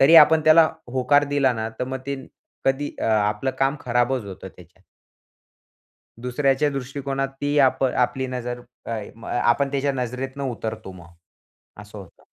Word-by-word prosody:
तरी 150 +5 +7
आपण 160 +1 +8
त्याला 155 0 +7 0.2
होकार 145 +3 +3
दिला 135 -3 +3
ना, 110 -1 -3
तर 125 - -1
मग 130 +1 -4
ते 140 - -1 0.5
कधी 135 +2 0
अ, - - -3
आपलं 110 +4 +1
काम 135 +2 +2
खराबच 120 0 0
होतं 95 -1 -8
त्याच्यात. 90 +1 -18 1.4
दुसऱ्याच्या 135 +4 +1
दृष्टिकोनात 135 0 -3
ती 145 +1 +1
आप 130 -1 +4
आपली 130 +1 0
नजर 125 -1 -4 0.3
आय 110 -3 -4
म 115 - -14
आ 120 - -1
आपण 140 +3 +1
त्याच्या 140 0 0
नजरेतून 130 +2 -4
उतरतो 110 -4 -6
मग, 85 -2 -13 0.7
असं 105 0 -11
होतं. 95 -4 -14
130 Hz, 155 wpm, -23 LUFS, 115-140 Hz, 1.4 s, आपण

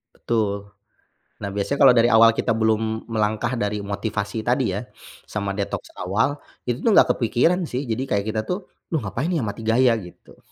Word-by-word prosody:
Betul. 100 -3 -2 0.7
Nah, 100 - -3
biasanya 105 +8 -1
kalau 130 -3 +8
dari 115 -1 +5
awal 115 0 +7
kita 115 - 0
belum 110 0 0
melangkah 110 +1 0
dari 105 -1 -2
motivasi 100 +1 -3
tadi 125 -2 +2
ya, 100 - -2 0.5
sama 100 -1 -3
detoks 100 0 -4
awal, 115 +11 0 0.3
itu 120 0 -1
tuh 230 - +3
nggak - - +6
kepikiran 125 +9 +2
sih. 130 -2 -3
Jadi, 110 +3 -1
kayak 100 -1 +1
kita 110 0 -1
tuh, 180 +1 -4 0.2
"Duh 160 - +1
ngapain 115 - -2
ya, 160 - 0
mati 110 +1 -4
gaya." 120 +2 +4
Gitu. 90 -4 -13
110 Hz, 175 wpm, -23 LUFS, 100-125 Hz, 0.7 s, kalau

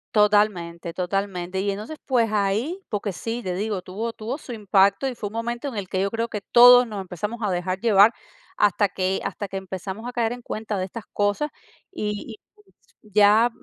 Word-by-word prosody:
Totalmente, 190 -5 +2
totalmente. 190 0 -2
Y 200 0 0
entonces, 215 +10 -6
pues 235 -5 +2
ahí, 215 - 0
porque 205 -1 -2
sí, 225 +6 -4
te 180 -1 -2
digo, 205 -1 -2
tuvo 220 +6 -5
tuvo 235 +6 -5
su 250 -5 -9
impacto. 200 +3 +3
Y 255 - -3
fue 205 - -4
un - - -16
momento, 235 +4 -3
en 250 - -9
el 200 -3 -4
que 185 - -1
yo 200 - 0
creo, 230 +1 -1
que 210 - -4
todos 245 +1 +9
nos 210 -4 -5
empezamos 200 +5 -5
a 210 - 0
dejar 185 +1 -2
llevar, 220 -1 +5 0.4
hasta 205 0 +3
que 190 0 -1
hasta 205 - -4
que 195 0 -5
empezamos 190 +4 -6
a - - -4
caer 235 -2 0
en 245 -1 -10
cuenta 215 -2 -4
de 185 - -1
estas 210 +3 -9
cosas. 205 +9 0 0.4
Y 210 - -4 0.6
y 215 - -20
ya 210 +3 +6
210 Hz, 200 wpm, -24 LUFS, 190-230 Hz, 0.6 s, todos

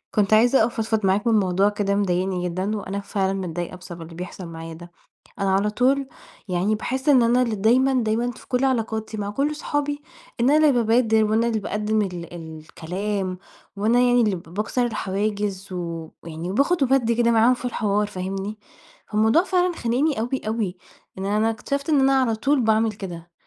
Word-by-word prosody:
كنت 210 0 +2
عايزة 235 +2 +5
أفضفض 220 -2 -1
معاك 195 +4 +1
من 230 - +4
موضوع 195 -1 +3
كده 205 -1 -1
مضايقني 185 -2 0
جدًا، 190 +5 -2
وأنا 200 0 -4
فعلًا 195 -1 -1
متضايقة 175 -2 -4
بسبب 175 -1 -10
اللي 165 0 -10
بيحصل 180 +1 -7
معايا 165 0 -8
ده، 175 +2 -12 0.5
أنا 195 -1 +1
على 200 +2 +2
طول 265 +5 +1 0.4
يعني 185 +3 +1
باحس 260 +6 -2
إن 260 -4 +6
أنا 240 +2 +3
اللي 235 -3 0
دايمًا، 250 +5 +3
دايمًا 225 +3 0
في 235 - -15
كل 250 +1 +1
علاقاتي 220 -4 -1
مع 205 -1 -3
كل 280 +8 0
أصحابي 290 -1 -2 0.4
إن 240 +3 +3
أنا 295 - +5
اللي - - +5
بابادر 225 -1 +3
وأنا 220 +2 +2
اللي 225 -2 0
باقدم 210 +1 -1
ال 175 -4 -5
الكلام 180 +4 -5 0.4
وأنا 220 +4 +3
يعني 245 0 +4
اللي 210 -4 +2
ب 170 - -7
باكسر 215 +5 0
الحواجز 200 -2 -2
و 170 -2 -5
ويعني 165 +2 -5
وباخد 280 - +2
وبادّي 250 -3 +2
كده 235 0 +3
معاهم 230 +2 +5
في 250 - -6
الحوار 210 -3 0
فاهمني، 195 +3 -5 0.5
فالموضوع 220 +10 +3
فعلًا 365 -2 +1
خانقني 255 +3 0
أوي 245 +4 -2
أوي 215 -5 -2 0.4
إن 190 - -4
أنا 210 +3 +1
اكتشفت 280 +6 -3
إن 295 -3 +4
أنا 270 0 +4
على 230 -3 +1
طول 270 +5 +1
باعمل 220 0 +2
كده، 175 -4 -8
215 Hz, 180 wpm, -23 LUFS, 190-245 Hz, 0.5 s, إن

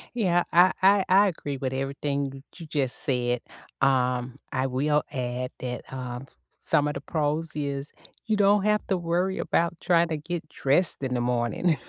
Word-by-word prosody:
Yeah. 175 -6 +2
I 180 +2 +7
I 195 0 +5
I 200 +2 +6
agree 145 -6 -4
with 130 0 -3
everything 135 0 -3
you 170 - -9
just 140 -4 -1
said, 125 -2 0 0.4
um, 125 -2 +1 0.2
I 130 +1 0
will 145 +3 +1
add 125 -1 -3
that, 125 -1 -4
um, 125 0 -6 0.4
some 145 0 +2
of 145 - -1
the - - -6
pros 155 0 -1
is 140 -1 -3 0.3
you 220 -2 +1
don't 205 0 +4
have 210 0 +2
to 190 - +1
worry 175 +2 0
about 170 0 +1
trying 170 -2 +3
to 160 -2 -2
get 165 +1 -5
dressed 145 +1 +1
in 130 -1 -1
the 120 - 0
morning. 120 - +1
145 Hz, 170 wpm, -26 LUFS, 130-175 Hz, 0.4 s, I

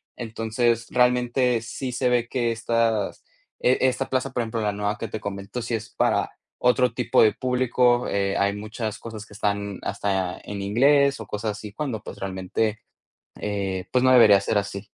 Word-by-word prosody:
Entonces, 115 0 -1
realmente 125 -1 +2
sí 125 +3 -5
se 125 +1 0
ve 120 -1 +1
que 120 -2 0
estas 115 -2 0 0.4
e 125 - +4
esta 130 +1 +1
plaza, 130 0 -1
por 125 - -1
ejemplo, 115 -1 -3
la 105 -1 +1
nueva 105 +1 -2
que 115 - -5
te 110 - -4
comento, 100 +4 -5
si 115 0 -4
es 110 0 -6
para - - +1 0.3
otro 125 -1 +3
tipo 125 0 +2
de 105 -2 +4
publico, 125 -1 +2
eh, 100 -1 0
hay 100 +1 +1
muchas 110 +1 -5
cosas 110 -2 -8
que 105 - -16
están 100 -1 -2
hasta 95 -2 -2
en 100 -1 -6
inglés 140 +7 +3
o - - -8
cosas 105 +1 -2
así 105 0 -8
cuando, 125 -5 -3
pues, - - -9
realmente, 100 +3 -2 0.6
eh, 95 -3 -3
pues 125 0 +2
no 130 - +5
debería 110 -5 +7
ser 105 +1 0
así. 100 0 -3
115 Hz, 180 wpm, -24 LUFS, 100-125 Hz, 0.6 s, debería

